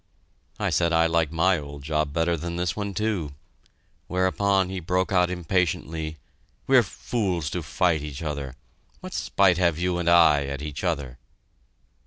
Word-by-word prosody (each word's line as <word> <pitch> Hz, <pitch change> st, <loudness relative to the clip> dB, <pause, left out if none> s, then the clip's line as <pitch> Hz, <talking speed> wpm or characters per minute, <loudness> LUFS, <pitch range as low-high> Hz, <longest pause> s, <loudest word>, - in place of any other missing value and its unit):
I -, -, 0 dB
said 85 Hz, -1 st, +2 dB
I 80 Hz, 0 st, +4 dB
liked 80 Hz, -2 st, +1 dB
my 90 Hz, +2 st, +2 dB
old 70 Hz, -1 st, -9 dB
job 75 Hz, -1 st, -1 dB
better 85 Hz, +2 st, +1 dB
than 85 Hz, +2 st, -5 dB
this 90 Hz, 0 st, -1 dB
one, 100 Hz, -2 st, -4 dB
too, 95 Hz, -10 st, -2 dB, 0.7 s
whereupon 95 Hz, +1 st, +1 dB
he 95 Hz, 0 st, -4 dB
broke 90 Hz, +3 st, -1 dB
out 90 Hz, -2 st, +3 dB
impatiently, 80 Hz, -3 st, -2 dB, 0.5 s
"We're 130 Hz, -2 st, +6 dB
fools 95 Hz, -6 st, -2 dB
to 90 Hz, -, -2 dB
fight 80 Hz, 0 st, +1 dB
each 75 Hz, 0 st, -6 dB
other. 70 Hz, -4 st, -4 dB, 0.5 s
What -, -, -8 dB
spite 95 Hz, -3 st, +2 dB
have 85 Hz, -4 st, +2 dB
you 90 Hz, 0 st, 0 dB
and 85 Hz, -1 st, +1 dB
I 80 Hz, -4 st, +5 dB
at 70 Hz, +1 st, -5 dB
each 75 Hz, +2 st, -6 dB
other?" 70 Hz, -8 st, -2 dB
85 Hz, 160 wpm, -25 LUFS, 75-90 Hz, 0.7 s, We're